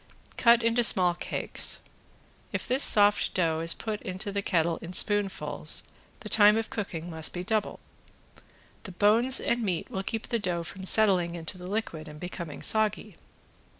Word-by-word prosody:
Cut 235 -1 +4
into 230 +1 +2
small 185 -6 +5
cakes. 175 - -1 0.7
If - - -4
this 260 +3 +1
soft 205 -4 +4
dough 165 -3 0
is 165 +1 -1
put 215 -2 -5
into 190 +3 -6
the 200 0 -2
kettle 170 -4 0
in 170 +2 -9
spoonfuls 185 -8 0 0.4
the 215 - -8
time 210 0 +5
of 225 - -4
cooking 175 -6 -5
must 160 -1 -2
be 180 - -5
doubled. 215 +2 -2 1.0
The 190 - -10
bones 225 +7 +3
and 235 0 -1
meat 185 -6 -3
will 190 - -3
keep 220 +3 -5
the 235 - -1
dough 175 -4 -3
from 190 +3 -9
settling 185 -5 +3
into 165 +2 -6
the 180 0 -10
liquid 185 -6 -4
and 150 0 -11
becoming 170 -3 -8
soggy. 215 -2 +1
190 Hz, 165 wpm, -27 LUFS, 170-215 Hz, 1.0 s, small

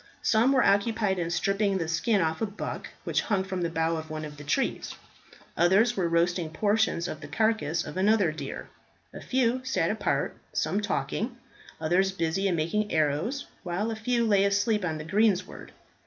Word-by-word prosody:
Some 230 +4 +4
were 260 -2 +4
occupied 200 -1 +2
in 170 -1 -1
stripping 195 +3 +1
the 165 -3 -2
skin 200 +5 +1
off 160 +2 -1
a 225 - +1
buck 205 +1 -6 0.2
which - - 0
hung 200 -4 0
from 190 -1 -4
the 170 - 0
bough 165 0 0
of 160 0 -7
one 155 0 -4
of 150 -1 -9
the 145 - -9
trees. 210 - -1 0.6
Others 195 +7 +4
were 180 -3 0
roasting 170 0 +1
portions 205 -1 +1
of 155 -3 -6
the 145 - -8
carcass 215 -4 0
of 150 - -7
another 200 -3 +3
deer. 145 -3 -6 0.5
A - - -8
few 255 0 +1
sat 260 - 0
apart, - - -1 0.2
some 205 - 0
talking, 220 +3 -2 0.4
others 180 +5 +2
busy 190 +2 0
in 180 - +1
making 205 +7 -1
arrows, 160 - 0 0.2
while 195 +5 -2
a - - -3
few 235 +1 0
lay 200 -3 +4
asleep 205 +1 +1
on 160 -3 -1
the 155 - -7
greensward. 200 +2 0
195 Hz, 185 wpm, -27 LUFS, 165-220 Hz, 0.6 s, Some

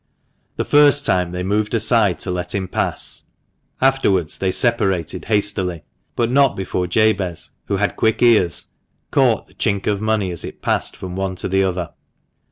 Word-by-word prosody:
The - - -2
first 145 -1 +5
time 90 -1 +1
they 90 +1 -4
moved 105 +4 0
aside 110 -4 +2
to 95 - -2
let 90 +1 -3
him 95 -1 -2
pass, - - -3 0.5
afterwards 115 - +1
they 95 - 0
separated 95 - 0
hastily; 100 -6 -1 0.3
but 120 0 0
not 140 -1 +4
before 90 -1 -2
Jabez, 100 -3 0
who 100 - -1
had 105 +1 -1
quick 110 -1 +1
ears, 105 -8 +3 0.5
caught - - +2
the - - -24
chink 100 -1 -1
of 105 -1 0
money 110 -4 0
as 85 - -6
it - - -9
passed - - 0
from 90 -1 -7
one 95 -1 -2
to 95 - -3
the 95 +1 +2
other. 90 -2 -2
95 Hz, 170 wpm, -19 LUFS, 90-110 Hz, 0.5 s, first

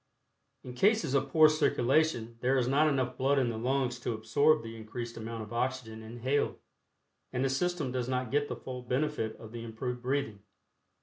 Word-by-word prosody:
In 125 - -8
cases 205 - +2
of 135 0 +1
poor 155 +2 +7
circulation 140 -5 +1
there 130 +3 +2
is 125 -2 +1
not 145 +4 +4
enough 130 -4 0
blood 135 +2 +3
in 130 -3 +2
the 110 - -5
lungs 125 0 0
to 120 -1 -2
absorb 115 +6 +3
the 115 0 -7
increased 115 +2 -6
amount 115 0 -5
of 105 +2 -10
oxygen 120 -2 -2
inhaled, 120 +5 -1 0.7
and 130 +1 0
the 135 - +1
system 160 -1 -1
does 125 -1 -2
not 125 -2 -1
get 145 +1 +1
the - - -4
full 125 -1 -7
benefit 125 -2 -1
of 110 - -11
the 115 0 -6
improved 120 +2 -4
breathing. 125 -5 -1
125 Hz, 185 wpm, -31 LUFS, 115-140 Hz, 0.7 s, poor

